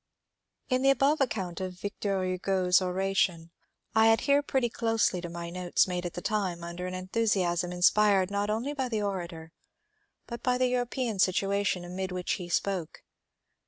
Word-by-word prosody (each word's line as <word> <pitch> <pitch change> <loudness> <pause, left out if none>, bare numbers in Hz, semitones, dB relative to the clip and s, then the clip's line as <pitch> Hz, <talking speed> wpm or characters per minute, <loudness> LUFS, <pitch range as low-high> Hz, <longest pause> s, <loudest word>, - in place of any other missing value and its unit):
In 255 -1 +1
the 270 - +4
above 275 +3 +3
account 190 -9 -2
of 185 -1 -5
Victor 200 0 -2
Hugo^s 185 0 +2
oration 185 -2 0 0.4
I 220 0 +5
adhere 280 +6 +4
pretty 265 -3 0
closely 225 -5 0
to 175 - -6
my 170 0 -6
notes 180 +1 +1
made 180 -1 -2
at 175 - -8
the 175 - -6
time 190 -5 -1
under 170 +1 -5
an 185 - -5
enthu 185 +5 -2
siasm 175 -3 +1
inspired 195 +1 +3
not 205 +1 -1
only 230 +7 -1
by 265 -3 -2
the 215 -3 -1
orator 170 -5 -4 0.7
but 235 -1 -7
by 250 -1 +1
the 255 0 +2
European 245 -3 -1
situation 195 -1 +1
amid 185 +1 -4
which 180 -1 -3
he 175 - -7
spoke. 180 -3 -2
195 Hz, 165 wpm, -29 LUFS, 180-225 Hz, 0.7 s, I